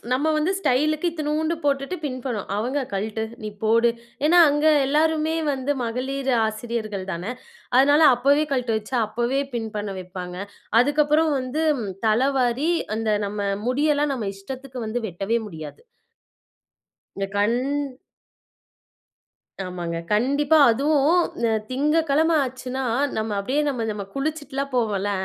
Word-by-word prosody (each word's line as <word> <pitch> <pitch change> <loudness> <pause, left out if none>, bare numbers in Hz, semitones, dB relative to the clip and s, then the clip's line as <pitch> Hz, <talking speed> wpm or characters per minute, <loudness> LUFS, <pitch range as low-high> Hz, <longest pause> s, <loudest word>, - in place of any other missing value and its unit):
நம்ம 285 +5 +1
வந்து 315 +5 +1
ஸ்டைலுக்கு 305 +2 +1
இத்துநூண்டு 310 +1 -1
போட்டுட்டு 280 +5 0
பின் 255 -3 -3
பண்ணுவோம். 230 -7 -3
அவங்க, 260 +6 -1
"கழ்ட்டு, 215 +3 -2 0.2
நீ 215 - -3 0.2
போடு!" 230 +2 +4 0.4
ஏன்னா 350 +3 +5
அங்க 295 +2 +1 0.2
எல்லாருமே 315 +2 +2 0.2
வந்து 270 +2 -1
மகளிர் 265 +3 -2 0.2
ஆசிரியர்கள் 215 -3 -4
தானே. 180 +8 -4 0.5
அதனால 285 +3 +5
அப்பவே 280 +5 +3
கழட்ட 250 -3 0
வச்சு, 215 +5 -9
அப்பவே 240 +5 -1
பின் 225 -2 -2
பண்ண 205 -1 -3
வைப்பாங்க. 180 -1 -7 0.4
அதுக்கப்புறம் 300 +3 +3
வந்து, 260 +5 -2 0.4
தலவாரி 260 +5 +2 0.3
அந்த 225 -1 -2 0.2
நம்ம 210 +1 -5 0.3
முடியெல்லாம் 290 +2 +2
நம்ம 220 -6 -3
இஷ்டத்துக்கு 255 +5 -8
வந்து 235 +3 -2
வெட்டவே 195 +6 -1
முடியாது. 155 -6 -9 1.4
என் 195 0 -2
கண் 210 +4 +2 2.1
ஆமாங்க. 175 -2 -4 0.2
கண்டிப்பா. 280 +8 +3
அதுவும் 295 +7 +3 0.5
திங்ககிழம 305 +3 +2
ஆச்சுன்னா, 260 0 -4 0.3
நம்ம 220 0 -2
அப்படியே 265 +9 0
நம்ம 245 -5 -2
நம்ம 205 -1 -4
குளிச்சுட்டுல்லாம் 280 -1 -3
போவோம்ல. 205 -4 0
260 Hz, 120 wpm, -23 LUFS, 220-295 Hz, 2.1 s, ஏன்னா